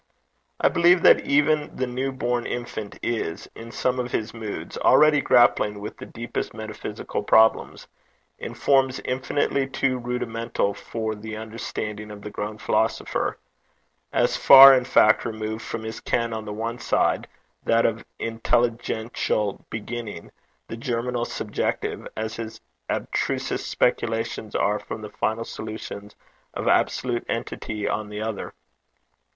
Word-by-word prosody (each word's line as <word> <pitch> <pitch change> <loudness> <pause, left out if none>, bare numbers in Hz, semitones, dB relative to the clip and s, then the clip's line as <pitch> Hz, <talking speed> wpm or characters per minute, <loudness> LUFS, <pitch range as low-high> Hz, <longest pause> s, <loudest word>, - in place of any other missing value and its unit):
I - - +4
believe 175 0 +4
that - - +8
even 150 +1 +2
the 130 - -1
new 130 +2 -2
born 120 -2 -1
infant 115 -4 -5
is, 110 -8 -2
in 115 +1 -10
some 130 +1 0
of 125 0 -3
his 110 0 -2
moods, 110 -3 -6
already 150 -1 +5
grappling 105 -5 +4
with 105 +1 -7
the - - -9
deepest 120 0 -5
metaphysical 110 -1 -5
problems, 110 +2 +3 0.5
in - - -6
forms 135 -2 +2
infinitely 135 +1 0
too 135 -1 0
rudimental 115 -3 -2
for 110 0 -4
the 110 +1 -7
understanding 105 -1 -5
of 105 -1 -10
the 105 - -6
grown 105 +1 -4
philosopher - - 0 0.7
as - - +2
far, 135 0 +10
in 125 -2 +3
fact, 110 -4 +5
removed 110 0 -4
from 115 0 -5
his 110 0 -5
ken 115 -1 -1
on 110 -1 -5
the 105 - -5
one 115 +3 -4
side, - - +1 0.4
that 115 0 +3
of 115 0 0 0.2
intelligential 115 -2 -1
beginning, 115 -5 -6 0.4
the 115 - -6
germinal 120 -1 -2
subjective, - - -3
as 110 0 -3
his 115 -1 -6 0.3
abstrusest - - -2
speculations 115 -2 -1
are 105 +1 +1
from 110 - -7
the 105 - -7
final 110 +1 -1
solutions 110 -1 -7 0.4
of - - -3
absolute 120 -2 +1
entity 105 -1 -3
on 105 -1 -2
the 105 0 -6
other. 110 -2 -5
115 Hz, 135 wpm, -24 LUFS, 110-125 Hz, 0.7 s, far